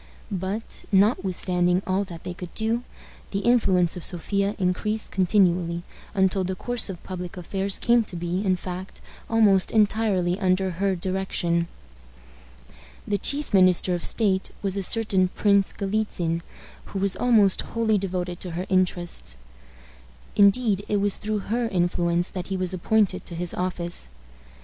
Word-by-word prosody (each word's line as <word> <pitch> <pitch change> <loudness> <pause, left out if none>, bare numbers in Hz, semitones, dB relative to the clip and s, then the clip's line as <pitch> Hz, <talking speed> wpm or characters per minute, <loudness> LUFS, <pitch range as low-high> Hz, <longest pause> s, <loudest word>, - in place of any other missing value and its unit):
But, 195 +4 -4
notwithstanding 185 -3 +2
all 190 +2 +1
that 170 -3 -10
they 180 - -5
could 175 -1 -9
do, 225 +2 0 0.5
the 195 - -2
influence 195 -8 +3
of 180 - -7
Sophia 200 +3 0
increased 210 +3 -1
continually, 175 -3 +2 0.3
until 190 0 +2
the 185 +1 -2
course 245 +3 +1
of 180 -3 -7
public 180 -1 -6
affairs 195 +2 -1
came 235 -1 +3
to 190 - -9
be, 175 +3 -2
in 190 -2 +2
fact, 185 +1 -7 0.3
almost 210 -4 +4
entirely 205 -4 +2
under 190 -1 +1
her 190 +2 0
direction. 175 -2 -1 1.4
The 205 -1 0
chief 285 +3 0
minister 185 -1 +4
of 175 - -3
state 195 -4 0
was 195 -1 0
a 200 - -1
certain 195 -2 +2
Prince 200 +1 +2
Galitzin, 195 -5 -1 0.4
who - - -7
was 195 0 +1
almost 215 -6 +4
wholly 220 -2 0
devoted 180 -2 -3
to 180 - -6
her 180 - -2
interests. 175 - 0 1.0
Indeed, 205 0 +4
it 210 - +1
was 200 0 +1
through 210 -1 -3
her 240 0 +1
influence 175 -2 +1
that 180 -2 -5
he 195 - -2
was 185 0 -2
appointed 190 +1 +1
to 170 - -7
his 175 +1 -1
office. 175 - -2
190 Hz, 145 wpm, -25 LUFS, 180-205 Hz, 1.4 s, almost